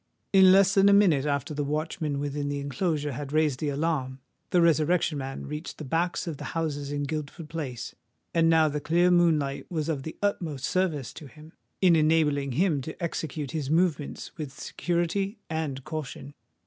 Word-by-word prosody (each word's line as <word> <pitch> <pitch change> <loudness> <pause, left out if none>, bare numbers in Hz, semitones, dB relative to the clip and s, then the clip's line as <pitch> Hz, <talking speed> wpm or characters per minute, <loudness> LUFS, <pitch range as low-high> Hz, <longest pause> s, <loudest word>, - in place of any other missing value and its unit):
In 190 -1 +8
less 195 +1 +5
than 200 0 +5
a - - +6
minute 170 -9 +4
after 140 0 -1
the 145 0 -2
watchman 150 0 -2
within 145 0 -2
the 145 0 -2
enclosure 145 +2 -1
had 140 +2 -6
raised 150 -4 +2
the 150 - -1
alarm, 140 -3 -1 0.3
the 180 - +3
Resurrection 165 -1 +2
Man 135 0 -5
reached 150 +3 -6
the - - -7
backs 170 +6 -1
of 165 -4 -4
the - - -8
houses 145 -3 -2
in 145 0 -2
Guildford 150 +2 -5
Place;—and 145 - -3
now 160 -1 +5
the 150 0 -2
clear 175 +4 +3
moonlight 155 -6 +2
was 160 -2 -2
of 150 -4 -1
the 160 +3 -7
utmost 160 -9 -1
service 170 -8 -1
to 150 - -10
him, 155 +3 -15 0.3
in 180 -3 +6
enabling 150 -4 +2
him 160 -1 +2
to 160 +4 -8
execute 160 -4 -3
his 150 -4 -3
movements 160 -3 0
with 140 -3 -6
security 180 +4 -1
and 150 -4 -3
caution. 145 -2 -6
155 Hz, 175 wpm, -27 LUFS, 145-170 Hz, 0.3 s, In